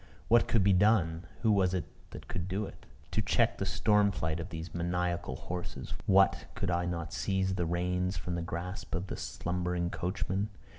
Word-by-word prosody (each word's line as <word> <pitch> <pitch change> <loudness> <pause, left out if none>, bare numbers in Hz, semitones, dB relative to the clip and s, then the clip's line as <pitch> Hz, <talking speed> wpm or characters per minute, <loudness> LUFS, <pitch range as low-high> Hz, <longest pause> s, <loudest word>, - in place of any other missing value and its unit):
What 120 0 +6
could 110 -5 +3
be 100 0 +5
done 90 -4 +3 0.2
who 110 - +5
was 95 -2 +3
it 90 - -1 0.2
that - - -10
could 90 -1 -3
do 95 +3 -1
it - - -12 0.2
to - - +1
check - - +2
the - - -1
storm 105 -1 +3
flight 80 -3 -2
of 85 +2 -5
these 80 -1 -6
maniacal 85 -4 -1
horses? 90 +5 -5
What! 95 0 +5
could - - -1
I 85 0 +1
not 85 -2 -3
seize 95 +1 0
the 90 -3 0
reins 90 +2 0
from 90 - -3
the 85 - -1
grasp 90 +4 -4
of 90 +1 -2
the - - -5
slumbering 90 0 -2
coachman? 95 +3 -1
90 Hz, 190 wpm, -31 LUFS, 85-95 Hz, 0.2 s, What